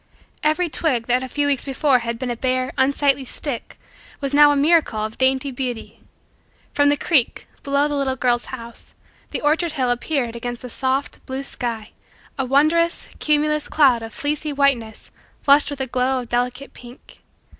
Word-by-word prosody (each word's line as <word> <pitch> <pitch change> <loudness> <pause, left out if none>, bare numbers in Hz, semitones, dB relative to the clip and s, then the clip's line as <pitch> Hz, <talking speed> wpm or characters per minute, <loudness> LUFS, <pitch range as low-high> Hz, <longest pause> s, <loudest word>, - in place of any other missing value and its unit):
Every 310 +4 +1
twig 280 -7 0
that 250 +1 +1
a 260 - -4
few 290 +3 -1
weeks 285 -2 +1
before 270 -1 +2
had 235 0 -4
been 250 0 -3
a - - -2
bare, 255 +1 -1
unsightly 275 0 +2
stick 260 -1 -4 0.4
was 275 -1 -3
now 295 0 +7
a - - +2
miracle 280 -8 +2
of 220 - -8
dainty 265 +1 +2
beauty. 245 -3 -5 0.7
From 285 0 +3
the 290 - +2
creek, 280 -5 +1 0.2
below 280 +1 +1
the 295 - -3
little 275 -2 0
girl's 245 -2 0
house, 235 -2 -10 0.3
the - - -4
orchard 310 +2 +1
hill 255 -4 0
appeared 245 -1 -2
against 240 +1 -5
the 250 - -8
soft, 265 +3 -2
blue, 265 0 -4
sky 235 -5 -5 0.4
a 265 - -2
wonderous, 310 +5 +2
cumulus, 300 0 +1
cloud 265 -6 +4
of 225 0 -7
fleecy 295 +3 -2
whiteness 275 -6 0 0.3
flushed 280 +1 +5
with 285 -1 -6
a - - 0
glow 255 +1 0
of 240 - -11
delicate 250 +3 -2
pink. 245 +1 -15
265 Hz, 175 wpm, -21 LUFS, 245-290 Hz, 0.7 s, now